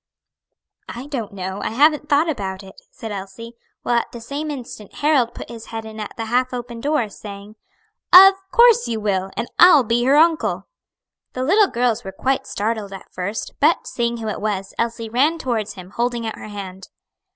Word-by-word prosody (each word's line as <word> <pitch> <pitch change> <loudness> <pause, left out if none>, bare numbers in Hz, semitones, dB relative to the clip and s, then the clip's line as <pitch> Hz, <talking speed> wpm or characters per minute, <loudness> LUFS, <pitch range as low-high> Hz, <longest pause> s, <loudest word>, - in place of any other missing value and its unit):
"I 245 +3 -7
don't 260 -8 -5
know; 190 0 -5
I - - -2
haven't 295 +5 +2
thought 295 +3 +3
about 195 -10 -4
it," 190 - -12 0.2
said 225 - -8
Elsie; 200 +4 -8 0.3
while 240 -1 +2
at - - -7
the 235 - -8
same 285 +6 -5
instant 245 -7 -8
Harold 285 -6 +1
put - - -8
his 230 -1 -10
head 225 -1 -6
in 220 0 -9
at 210 +4 -7
the 225 - -3
half 250 +2 0
open 240 -1 -7
door, 290 -5 0
saying, 205 0 -10 0.6
"Of 385 +2 +10 0.2
course 475 -1 +5
you 225 -1 -2
will; 195 -3 -1
and - - -2
I'll 345 -6 +8
be 235 +1 +1
her 270 +2 +4
uncle." 325 0 +2 0.7
The 255 - -3
little 395 +9 +4
girls 240 -1 0
were 190 - -6
quite 265 +6 -1
startled 210 -1 -3
at 195 - -11
first, 200 +4 -4
but 310 +4 +3
seeing 235 0 -2
who 225 -1 -5
it 215 - -4
was, 200 -2 -3
Elsie 230 0 -2
ran 275 +9 +2
towards 230 -8 -2
him, 185 -1 -11
holding 240 +1 -2
out 220 - -4
her - - -8
hand. 190 -2 -8
230 Hz, 195 wpm, -21 LUFS, 210-275 Hz, 0.7 s, Of